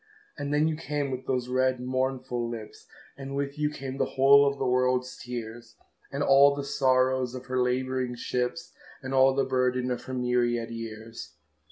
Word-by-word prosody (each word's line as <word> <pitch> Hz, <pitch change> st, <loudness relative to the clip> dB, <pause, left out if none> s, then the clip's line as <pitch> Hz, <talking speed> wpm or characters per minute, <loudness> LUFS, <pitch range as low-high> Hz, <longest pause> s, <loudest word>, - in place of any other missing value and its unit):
And 145 Hz, -1 st, -4 dB
then 150 Hz, +1 st, +3 dB
you 160 Hz, -, -1 dB
came 145 Hz, -1 st, -3 dB
with 130 Hz, 0 st, -5 dB
those 125 Hz, -2 st, -1 dB
red 130 Hz, 0 st, +1 dB
mournful 125 Hz, -1 st, -2 dB
lips, 115 Hz, -2 st, -9 dB, 0.3 s
And 135 Hz, 0 st, -7 dB
with 140 Hz, +1 st, -3 dB
you 150 Hz, 0 st, +1 dB
came 135 Hz, -2 st, -6 dB
the -, -, -2 dB
whole 140 Hz, +1 st, +7 dB
of 140 Hz, 0 st, -1 dB
the 135 Hz, -, -2 dB
world's 125 Hz, 0 st, +1 dB
tears, 120 Hz, -1 st, -8 dB, 0.4 s
And 140 Hz, +1 st, -1 dB
all 140 Hz, +1 st, +6 dB
the 140 Hz, -, -4 dB
sorrows 130 Hz, -2 st, +1 dB
of 130 Hz, 0 st, -8 dB
her 130 Hz, 0 st, -1 dB
labouring 130 Hz, 0 st, -1 dB
ships, 125 Hz, +7 st, -3 dB, 0.3 s
And 135 Hz, 0 st, -4 dB
all 135 Hz, 0 st, +5 dB
the 135 Hz, -, +2 dB
burden 125 Hz, 0 st, 0 dB
of 125 Hz, -, -4 dB
her 130 Hz, -, -5 dB
myriad 120 Hz, -2 st, 0 dB
years. 115 Hz, 0 st, -8 dB
130 Hz, 180 wpm, -27 LUFS, 125-135 Hz, 0.4 s, whole